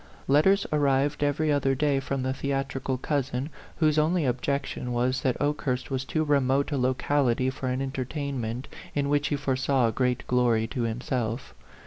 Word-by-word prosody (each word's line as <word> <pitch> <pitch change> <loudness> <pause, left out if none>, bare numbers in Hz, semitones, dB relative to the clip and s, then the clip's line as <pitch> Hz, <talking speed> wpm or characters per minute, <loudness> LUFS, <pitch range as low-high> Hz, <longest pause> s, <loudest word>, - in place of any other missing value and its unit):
Letters 190 +9 +4
arrived 145 0 +2
every 150 +2 +1
other 135 -2 +2
day 140 0 +2
from 135 -1 -3
the 130 0 0
theatrical 135 -1 -2
cousin, 140 +1 -2 0.2
whose 155 -2 +3
only 160 +1 +2
objection 125 0 -2
was 130 +2 +1
that 130 -2 0
Okehurst 140 -3 -1
was 135 0 -1
too 155 +3 0
remote 140 -1 +2
a 145 - 0
locality 130 0 +1
for 130 -1 -5
an 130 +1 -1
entertain 135 0 -3
ment 115 +4 -4 0.3
in 140 -1 0
which 145 0 +2
he 145 - 0
foresaw 130 -3 +1
great 125 0 0
glory 120 -3 +2
to 120 +2 -4
himself. 120 +1 -3
135 Hz, 160 wpm, -27 LUFS, 125-145 Hz, 0.3 s, Letters